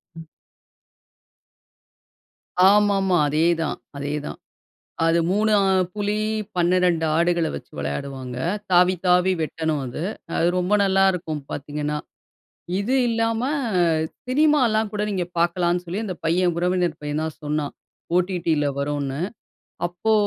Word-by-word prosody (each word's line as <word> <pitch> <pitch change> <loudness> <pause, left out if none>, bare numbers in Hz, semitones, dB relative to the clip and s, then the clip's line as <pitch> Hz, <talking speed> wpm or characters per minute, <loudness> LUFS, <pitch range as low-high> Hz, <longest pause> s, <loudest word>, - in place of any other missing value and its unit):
ம். 165 0 -9 2.5
ஆமா, 205 0 +4
ஆமா. 185 -2 +2
அதே 155 +3 +2 0.2
தான், 155 - -2 0.2
அதே 145 +1 -3
தான். - - -6 0.7
அது 165 +1 +3
3 210 +3 +2
அ - - +2 0.3
புலி 210 0 -1 0.4
12 175 -1 +2
ஆடுகள 170 -1 +2
வச்சு - - -10
விளையாடுவாங்க. 125 - -4 0.3
தாவி, 180 +1 +5
தாவி 180 +1 +4
வெட்டணும் 160 -1 -1
அது. 125 +5 -5 0.3
அது 170 - +3
ரொம்ப 180 +3 0
நல்லாயிருக்கும் 190 -5 +1
பார்த்தீங்கன்னா! 150 +1 -3 0.8
இது 215 +6 0
இல்லாம 225 0 0 0.8
சினிமாலாம் 255 -6 +3
கூட 210 0 -2
நீங்க 185 -3 -1
பார்க்கலாம்ன்னு 175 +1 +1
சொல்லி 185 +6 -3
அந்த 190 -4 -4
பையன் 175 +2 +2
உறவினர் 180 -2 0
பையன் 150 +1 -2
தான் 160 -1 -6
சொன்னான். 150 -1 -2 0.4
OTTல 175 -4 +1
வருன்னு. 140 -1 -2 0.7
அப்போ 175 +6 -1
175 Hz, 115 wpm, -23 LUFS, 155-195 Hz, 2.5 s, தாவி